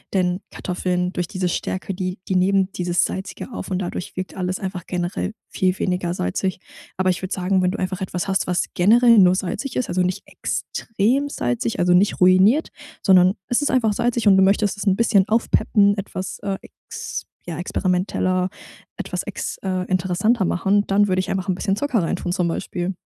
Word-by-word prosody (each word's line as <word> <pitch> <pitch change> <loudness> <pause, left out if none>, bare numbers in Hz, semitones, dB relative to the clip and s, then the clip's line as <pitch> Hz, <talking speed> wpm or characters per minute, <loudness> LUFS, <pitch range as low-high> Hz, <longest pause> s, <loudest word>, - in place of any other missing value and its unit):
denn 180 -1 +1
Kartoffeln, 180 0 -2
durch 175 -1 -2
diese 185 0 -2
Stärke, 185 +2 -3
die 185 0 -3
die 190 - 0
nehmen 190 +1 +2
dieses 175 -2 0
Salzige 190 +6 -5
auf, - - -6
und 185 - -1
dadurch 180 -1 -5
wirkt 185 0 -5
alles 185 0 -2
einfach 185 -3 -5
generell 175 +3 -2 0.2
viel 185 0 0
weniger 180 -2 -1
salzig. 180 - -2 0.4
Aber 185 0 +2
ich 180 - -4
würde 185 0 -5
sagen, 185 0 +1
wenn 180 - +2
du 195 - -3
einfach 185 0 -3
etwas 180 -1 -3
hast, 195 -1 0
was 180 -1 +1
generell 230 +5 +5
nur 185 -1 +6
salzig 200 +8 -3
ist, 255 - -1
also 185 - +1
nicht 180 +1 -1
extrem 240 +7 -1
salzig, 120 - -2
also 180 0 +3
nicht 190 +3 +3
ruiniert, 190 - +5 0.3
sondern 185 0 +5
es 245 +4 +1
ist 290 - +1
einfach 230 -5 +2
salzig 235 0 0
und 195 -1 +7
du - - +5
möchtest 200 +2 +3
es 205 0 -5
'n 190 - +4
bisschen 205 -3 +3
aufpeppen, 210 -2 +3
etwas 190 -1 -5
äh, 195 -1 -2
ex - - -8 0.2
ja, 175 -1 -5
experimenteller 185 0 0 0.5
etwas - - -3
ex - - -5
äh, 185 -1 -1
interessanter 190 +4 +1
machen, 200 +4 +1
dann 205 +1 +3
würde 185 -1 +1
ich 185 +1 -2
einfach 190 0 -2
'n 185 - +2
bisschen 195 +1 0
Zucker 250 -1 0
reintun 175 +1 -2
zum 180 -2 0
Beispiel. 175 +2 -3
185 Hz, 190 wpm, -22 LUFS, 180-200 Hz, 0.5 s, und